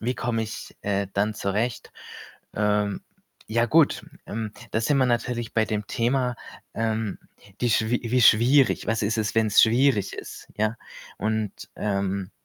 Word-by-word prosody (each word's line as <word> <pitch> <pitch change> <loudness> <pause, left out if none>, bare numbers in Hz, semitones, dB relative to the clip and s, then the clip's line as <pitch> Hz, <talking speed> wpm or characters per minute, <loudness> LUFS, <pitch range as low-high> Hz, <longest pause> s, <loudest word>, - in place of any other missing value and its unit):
wie 125 +3 -1
komme 115 -2 -1
ich, 110 +1 -8
äh, 100 -1 0
dann 105 +2 0
zurecht? 105 +4 -2 0.6
Ähm, 105 -1 0 0.5
ja 115 +1 +2
gut, 160 +3 +3 0.2
ähm, 110 0 -4 0.2
da 110 - 0
sind 140 +5 +1
wir 130 - +4
natürlich 120 -1 -1
bei 110 -1 +3
dem 105 -1 -3
Thema, 125 +1 0 0.4
ähm, 110 -2 -2 0.4
die 120 - +1
schwier 110 +2 +2
wie 125 0 +3
schwierig. 125 +6 +5
Was 115 +1 0
ist 110 +2 0
es, 105 -1 -1
wenn's 110 -2 +4
schwierig 120 -3 +3
ist, - - -9
ja? 110 +2 0 0.4
Und, 110 0 -3
ähm 100 -2 -2
110 Hz, 150 wpm, -25 LUFS, 105-120 Hz, 0.6 s, schwierig